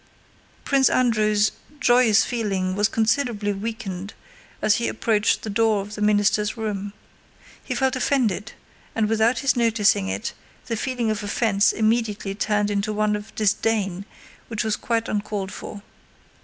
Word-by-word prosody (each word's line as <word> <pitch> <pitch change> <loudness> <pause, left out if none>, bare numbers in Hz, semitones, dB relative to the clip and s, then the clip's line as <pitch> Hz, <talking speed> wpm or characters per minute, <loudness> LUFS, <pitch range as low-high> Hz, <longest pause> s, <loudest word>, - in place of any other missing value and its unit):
Prince 270 -1 +4
Andrew's 215 -4 +2 0.3
joyous 240 -4 +4
feeling 195 -6 -1
was 205 +2 +2
considerably 220 -2 0
weakened 200 -2 -5 0.4
as 210 - +3
he 235 - -1
approached 220 -1 +1
the 220 - -4
door 220 0 +2
of 205 +1 -9
the 210 - -6
minister's 210 +1 +2
room. 205 -2 -4 0.7
He - - -4
felt 265 -1 +1
offended, 240 -7 0 0.4
and 220 -1 +1
without 225 +3 +2
his 275 - +3
noticing 220 - +2
it 95 +2 -3 0.3
the 230 - -2
feeling 240 -1 -1
of 215 -1 -3
offense 205 0 +2
immediately 215 -3 0
turned 210 0 0
into 205 +1 -1
one 210 0 +1
of 210 +1 -8
disdain 200 -2 0 0.4
which 225 -3 -2
was 220 -1 0
quite 230 0 -1
uncalled 205 -2 -3
for. 205 -1 -8
215 Hz, 140 wpm, -23 LUFS, 205-225 Hz, 0.7 s, Prince